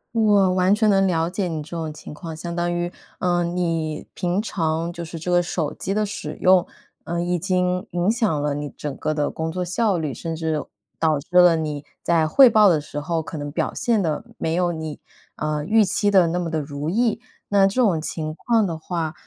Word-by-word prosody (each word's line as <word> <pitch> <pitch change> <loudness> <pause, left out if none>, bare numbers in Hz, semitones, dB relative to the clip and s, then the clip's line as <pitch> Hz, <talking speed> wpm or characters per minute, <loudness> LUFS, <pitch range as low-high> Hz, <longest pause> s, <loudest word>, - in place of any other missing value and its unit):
我 205 -4 +4
完 185 +1 +3
全 215 0 +3
能 195 -1 +4
了 165 -2 +1
解 185 0 -2
你 160 -2 -3
这 150 - -12
种 160 -3 -4
情 150 - -10
况。 165 +2 -7
相 170 +1 -5
当 175 0 0
于 175 0 -1 0.3
呃， 175 -1 +1
你， 165 -3 -2
平 180 +2 -1
常 165 -4 -2
就 170 - -6
是 165 0 -7
这 170 +3 -5
个 175 0 +3
手 160 -3 -2
机 195 - -3
的 215 0 +1
使 155 -7 -6
用， 185 -1 +5 0.4
呃， 170 +1 -2
已 175 0 0
经 180 0 0
影 175 +3 +1
响 220 - +1
了 145 -1 0
你 145 0 -4
整 145 0 -6
个 155 - -2
的 150 -1 0
工 160 0 -3
作 180 +1 -2
效 200 +1 +1
率， 155 -4 -2
甚 165 +4 -5
至， 160 -2 -2 0.3
导 155 -3 +2
致 160 +5 -11
了 175 -2 +7
你 150 -2 -3 0.2
在 165 -2 +2
汇 255 - +7
报 215 -3 +6
的 160 -4 +3
时 150 0 -6
候， 165 +2 -1
可 160 - -7
能 145 0 -5
表 - - -1
现 235 -6 +1
得 160 +3 -1
没 160 0 -1
有 175 0 +1
你， 160 -2 -6 0.3
呃， 150 0 -2
预 220 +3 +4
期 205 +1 +1
的 190 -4 +5
那 175 +2 -1
么 175 -2 -2
地 160 - -1
如 145 +1 -4
意。 225 +3 +1 0.3
那 200 -1 +5
这 230 +6 0
种 190 -9 +3
情 155 -1 -4
况 225 +5 +1
的 165 -3 -3
话 160 -1 -3
170 Hz, 240 characters per minute, -22 LUFS, 160-190 Hz, 0.4 s, 了